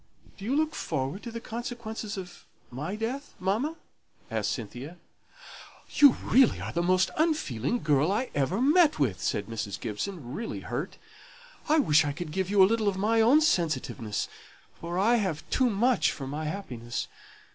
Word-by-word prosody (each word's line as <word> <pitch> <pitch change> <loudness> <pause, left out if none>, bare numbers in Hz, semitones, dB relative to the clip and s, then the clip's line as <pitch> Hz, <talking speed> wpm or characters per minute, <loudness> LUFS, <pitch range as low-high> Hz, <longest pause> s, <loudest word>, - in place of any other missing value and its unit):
"Do 195 - -9
you 255 +5 0
look 310 +1 +1
forward 135 +9 -3
to 240 - -7
the 230 - -5
consequences 225 -2 -5
of 180 -2 -9 0.3
my 150 +10 -4
death, 245 +6 -4
mamma?" 220 - 0 0.6
asked - - 0
Cynthia. 130 - -6 0.9
"You 285 -4 +7
really 255 0 +4
are - - -5
the 170 - +1
most 185 +1 +2
unfeeling 245 - 0
girl 150 +3 +3
I 230 +6 -1
ever 145 +8 0
met 300 +4 +4
with," 125 -11 0
said 100 - -1
Mrs. 105 -4 -5
Gibson, 125 - -5
really 225 +8 -4
hurt. - - -4 0.7
"I 310 - +5
wish 155 - +5
I 145 -1 -2
could 165 0 -6
give 190 +2 -1
you 200 -1 +6
a - - +9
little 220 +1 +1
of 195 -2 +1
my 225 +3 +2
own 260 +8 +6
sensitiveness, 150 - 0 0.5
for 170 +1 -5
I 225 +5 +4
have 190 -8 -2
too 255 -1 +3
much 235 +4 +2
for 135 - -6
my 150 +4 -4
happiness. 125 -9 -4
190 Hz, 170 wpm, -28 LUFS, 145-235 Hz, 0.9 s, a